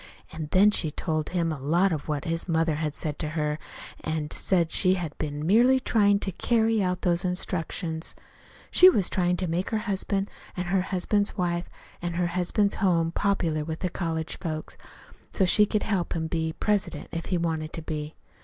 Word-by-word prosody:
An' 160 -1 -5
then 200 +5 +5
she 165 -6 +2
told 155 0 -2
him 170 -2 0
a 155 - -4
lot 170 +8 +2
of 155 -3 -3
what 150 0 -2
his 165 +1 -2
mother 165 -1 +2
had 155 -1 -2
said 150 -2 -3
to 155 - -2
her, 150 0 -1 0.4
an' 155 -1 -2
she - - -4
said 170 -4 +1
she 185 0 +4
had 165 -5 -4
been 150 0 -3
merely 240 +8 +5
tryin' 205 -5 +3
to 190 - -1
carry 225 +3 +1
out 180 -1 -1
those 175 0 +2
instructions. 175 -2 -3 0.6
She 370 - +9
was 200 - +2
tryin' 180 -2 +1
to 185 - -1
make 170 +3 -1
her 220 - 0
husband 195 0 -1 0.3
and 180 - -2
her 190 0 +2
husband's 200 +3 0
wife 175 -1 -1 0.3
an' 175 0 -3
her 175 +1 0
husband's 190 +3 +1
home 170 -4 +2
popular 170 -6 0
with 160 +1 -5
the 180 - 0
college 165 -2 -3
folks, 155 -2 -5 0.6
so 190 - +2
she 210 +3 +5
could 210 0 0
help 195 -5 -1
him 165 - -1
to 160 - -4
be 160 -1 -1
president, 205 +4 -1
if 165 -1 -4
he 180 - +1
wanted 160 -2 -2
to 165 - -5
be. 155 -1 -5
175 Hz, 200 wpm, -26 LUFS, 160-195 Hz, 0.6 s, She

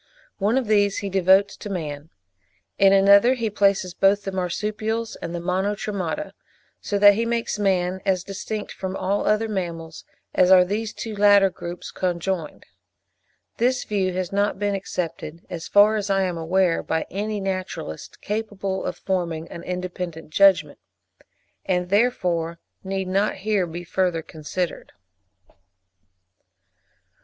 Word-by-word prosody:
One 210 +5 +2
of 265 - 0
these 205 -2 +2
he 195 - -3
devotes 190 +1 +4
to 210 - -8
man; 155 -5 -5 0.7
in 195 0 +6
another 200 +5 +6
he 230 -3 -2
places 195 -3 +2
both 200 +2 +3
the 195 - -4
marsupials 215 +5 -2
and 170 +1 -6
the - - -3
Monotremata; 195 - -2 0.5
so 205 - -2
that 205 0 +8
he 225 +3 0
makes 230 -2 -2
man 190 -2 +1
as 185 -3 +1
distinct 205 +2 -5
from 190 0 -5
all 195 +2 -1
other 215 +1 +2
mammals 170 -5 -5 0.3
as 185 - +4
are 185 -1 +7
these 210 +3 -2
two 225 -2 -6
latter 200 -1 +5
groups 175 0 -7
conjoined. 180 -3 -3 0.9
This 250 +2 +1
view 195 -3 -1
has 185 -1 -3
not 200 0 0
been 205 0 -1
accepted, 170 -4 -5
as 165 -1 -5
far 205 +2 +5
as 205 -1 -3
I 195 -1 +2
am 180 -2 -1
aware, 170 +1 +1
by 160 0 -2
any 210 +2 -2
naturalist 185 - -5
capable 205 -3 -3
of - - -3
forming 170 -4 -2
an 170 - -8
independent 180 -3 -5
judgment, 195 +1 +4 0.8
and 180 -1 -1
therefore 180 -6 +1 0.3
need 190 0 -3
not 195 +3 +1
here 195 -2 0
be 170 +2 -7
further 175 -2 -1
considered. 165 +4 -5
190 Hz, 140 wpm, -23 LUFS, 180-205 Hz, 0.9 s, that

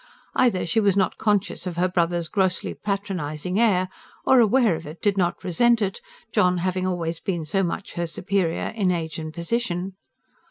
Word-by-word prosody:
Either 235 -8 +2
she 170 +6 +1
was 200 -2 +3
not 190 - +1
conscious 205 -3 0
of 175 -2 -5
her 180 +1 +3
brother's 175 -2 0
grossly 190 0 0
patronising 185 -3 -3
air, 190 -6 +3 0.4
or, 260 - +6
aware 230 -3 +4
of 160 -1 -8
it, 155 +3 -9
did 205 -2 +1
not 175 -3 0
resent 235 +7 +3
it, 200 -2 -2 0.3
John 180 0 +3
having 185 +1 -1
always 170 -2 -2
been 170 -5 -3
so 195 +6 0
much 185 +1 -3
her 170 -1 -2
superior 180 0 -1
in 210 -4 0
age 165 -2 -2
and 155 0 -5
position. 180 +1 -2
185 Hz, 175 wpm, -24 LUFS, 170-200 Hz, 0.4 s, or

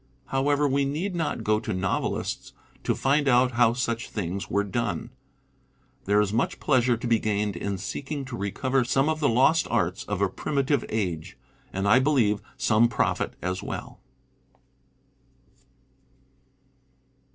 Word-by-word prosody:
However, 145 +2 +2
we 140 +1 +1
need 155 +8 -2
not 160 -9 -2
go 110 0 +2
to 110 -1 -4
novelists 95 +1 -2 0.3
to - - +1
find 145 +2 +2
out 125 0 +4
how 120 -1 +4
such 115 -2 -2
things 95 -1 -4
were 100 +2 +1
done. 100 - -3 0.9
There 105 +1 +3
is 105 -1 +1
much 115 - 0
pleasure 125 -4 +2
to 120 - -7
be 115 -2 +3
gained 105 -2 -1
in 100 +3 -3
seek 115 +9 -6
ing 145 -3 -3
to 130 -2 -6
recover 130 +6 0
some 135 +4 +1
of 155 0 -1
the 145 - +2
lost 135 +8 +3
arts 90 +1 0
of 100 -2 -3
a 100 - +3
primitive 140 +7 0
age; 90 -8 -3 0.3
and, 95 +1 -1
I 110 +5 +6
believe, 125 -8 +2 0.2
some 110 +2 +4
profit 120 - -1
as 90 +1 -2
well. - - -6
120 Hz, 150 wpm, -26 LUFS, 100-135 Hz, 0.9 s, I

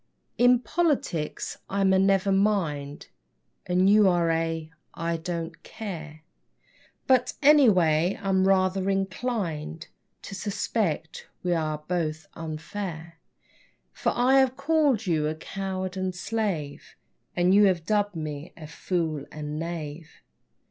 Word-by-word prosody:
In 245 +1 +6
politics 265 - -1
I'm 195 -1 +2
a 190 - +4
never 195 0 +3
mind, 170 -8 0 0.6
And 180 +1 +3
you 205 -1 +6
are 170 -2 +2
a 165 -1 -2 0.2
I 165 0 -2
don't 165 -1 -5
care, 160 -7 -8 0.8
But, 255 -2 +3
anyway, 185 - +5
I - - -6
am 190 0 +3
rather 190 0 +2
inclined 190 -5 -2 0.3
To - - -8
suspect 195 -4 -2 0.2
we 180 -1 +1
are 155 -2 -2
both 160 -3 -2
unfair; 165 +1 -6 0.7
For - - 0
I 255 +3 +4
have 265 -1 +2
called 280 -6 +2
you 155 -4 +1
a 155 - -2
coward 190 +2 -4
and 185 -1 -2
slave 180 -7 -3 0.4
And 175 +1 +3
you 205 +1 +7
have 180 -4 +1
dubbed 205 -1 +1
me 155 0 -6
a 160 - -9
fool 160 -2 -3
and 150 0 -5
knave. 165 -1 -5
180 Hz, 125 wpm, -26 LUFS, 160-205 Hz, 0.8 s, you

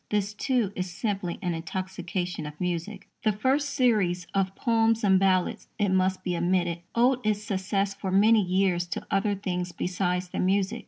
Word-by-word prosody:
This, 205 0 0
too, 225 -2 0
is 185 0 -3
simply 195 -1 -3
an 175 -1 0
intoxication 180 -1 -4
of 150 0 -10
music. 180 +3 -3
The 215 - +2
first 265 +8 +1
series 215 - +1
of 195 -1 0
Poems 225 -1 +2
and 190 -2 +5
Ballads, 185 -2 +1
it 205 -1 +1
must 185 0 +1
be 180 - -1
admitted, 175 0 0 0.2
owed 250 +2 +3
its 210 -1 0
success 195 0 -1
for 195 -1 -5
many 210 +4 +5
years 180 -1 +1
to 175 - -5
other 200 +1 +1
things 180 -2 -3
besides 180 +1 -2
the - - -4
music. 195 +4 +1
190 Hz, 170 wpm, -27 LUFS, 180-210 Hz, 0.2 s, and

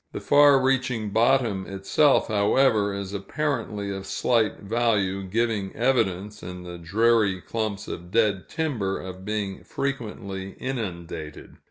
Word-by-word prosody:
The - - -4
far 145 -1 +6
reaching 125 -5 0
bottom 115 -4 +2
itself, 100 +9 +2
however, 105 0 +3
is 100 0 -5
apparently 105 -2 -2
of 95 0 -7
slight 115 -3 +1
value, 105 -3 +1
giving 105 0 -1
evidence, 105 -5 0
in 90 0 -7
the 90 -1 -8
dreary 105 +2 +2
clumps 110 0 -3
of 85 0 -7
dead 105 -2 +1
timber, 120 -12 -2
of 95 0 -8
being 105 -2 -3
frequently 105 -8 -4
inundated. 85 - -6
105 Hz, 125 wpm, -25 LUFS, 95-120 Hz, -, far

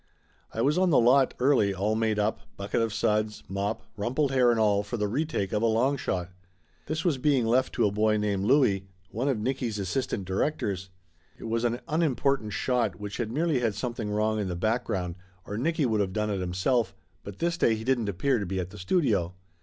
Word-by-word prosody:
I 115 - -1
was 150 +6 +2
on 185 -1 +3
the 155 - +4
lot 130 +3 +4
early, 125 -7 +3
all 100 +3 0
made 110 -1 +1
up, 105 +1 0 0.2
bucket 100 +3 -1
of 115 -1 0
suds, 105 0 0
mop, 100 +3 -3
rumpled 130 +7 0
hair 130 -2 +4
and 115 -1 +2
all, 105 -2 +3
for 105 +4 -5
the 105 -1 0
retake 125 - -2
of 105 - +1
a 115 - +3
long 120 +5 +2
shot. 90 -8 -3 0.6
This 160 +2 -3
was 155 -7 +1
being 135 -3 +2
left 125 +3 +2
to 120 - +2
a 100 - +2
boy 110 +1 +2
named 100 -2 0
Louie, 105 -7 +3 0.2
one 120 +6 -2
of 135 -4 +1
Nicky's 120 -1 -2
assistant 100 0 -2
directors. 95 - -2 0.5
It - - -12
was 115 +1 -1
an 120 0 0
unimportant 140 -7 +1
shot 125 +4 0
which 105 0 -6
had 115 -3 -2
merely 155 +1 +1
had 115 -4 0
something 115 0 -3
wrong 110 +1 0
in 100 - -1
the 90 - -3
background, 95 -3 -1 0.3
or 105 - -5
Nicky 155 +6 0
would 110 -3 +1
of 95 -2 -2
done 105 0 -1
it 100 - -1
himself, 95 +7 0 0.3
but 100 -1 -9
this 170 0 0
day 115 -9 +3
he 110 - -6
didn't 120 -4 +1
appear 120 +7 +1
to 100 - -3
be 95 +1 -2
at 90 0 -4
the 105 - -10
studio. 95 - +1
110 Hz, 215 wpm, -27 LUFS, 100-130 Hz, 0.6 s, the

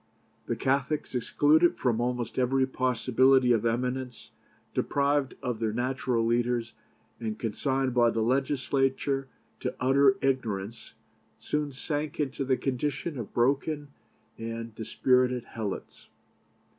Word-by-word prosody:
The - - 0
Catholics, 140 +3 -1
excluded 150 +7 +3
from 120 -3 +1
almost 125 0 -2
every 130 +1 +2
possibility 130 0 +3
of 115 -1 +3
eminence, 125 +1 -3 0.4
deprived 140 -1 +1
of 125 -4 -2
their 110 -1 0
natural 125 -1 0
leaders, 120 0 0 0.5
and 110 -2 -3
consigned 130 +4 -1
by 120 -1 +4
the 115 -1 0
Legislature 135 +1 0 0.3
to 125 - -3
utter 140 +9 +4
ignorance, 115 -6 -2 0.4
soon 150 -1 -2
sank 145 +2 -4
into 140 -2 -1
the 130 -1 +1
condition 140 +4 -2
of 115 - -6
broken 140 +4 0 0.5
and 115 0 -5
dispirited 125 +2 +1
helots. 110 -5 -6
130 Hz, 115 wpm, -28 LUFS, 120-135 Hz, 0.5 s, by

